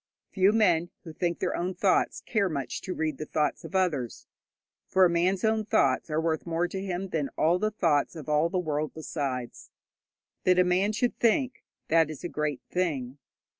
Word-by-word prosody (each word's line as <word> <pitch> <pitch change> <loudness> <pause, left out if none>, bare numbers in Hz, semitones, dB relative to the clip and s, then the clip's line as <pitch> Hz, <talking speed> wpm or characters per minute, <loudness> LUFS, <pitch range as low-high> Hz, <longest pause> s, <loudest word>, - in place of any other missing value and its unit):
Few 190 0 +4
men 175 -6 +3
who 160 - -9
think 170 +1 -1
their - - -1
own 180 +2 -2
thoughts 185 +1 +1
care 205 -4 0
much 140 -5 -4
to 185 - -5
read 155 -3 -2
the 155 - -5
thoughts 150 -1 -1
of - - -8
others, 150 - -1 0.6
for 185 0 +5
a - - +4
man's 180 +2 +1
own 220 0 +2
thoughts 140 -7 +2
are 155 0 0
worth 160 0 -1
more 170 +1 0
to 190 +2 -4
him 190 0 -3
than 150 -5 -1
all 170 +3 +3
the 215 - +1
thoughts 165 -8 +1
of 155 -4 -8
all 150 +2 +2
the 185 - -2
world 155 -3 -2
besides. 135 -6 -4 0.7
That 180 -1 +4
a 180 - +6
man 185 +3 +2
should 240 +3 -1
think, 250 +3 +1 0.3
that 160 -1 +4
is 155 +1 -8
a 175 - -3
great 150 -3 -2
thing. 145 -7 -2
170 Hz, 195 wpm, -28 LUFS, 150-185 Hz, 0.7 s, a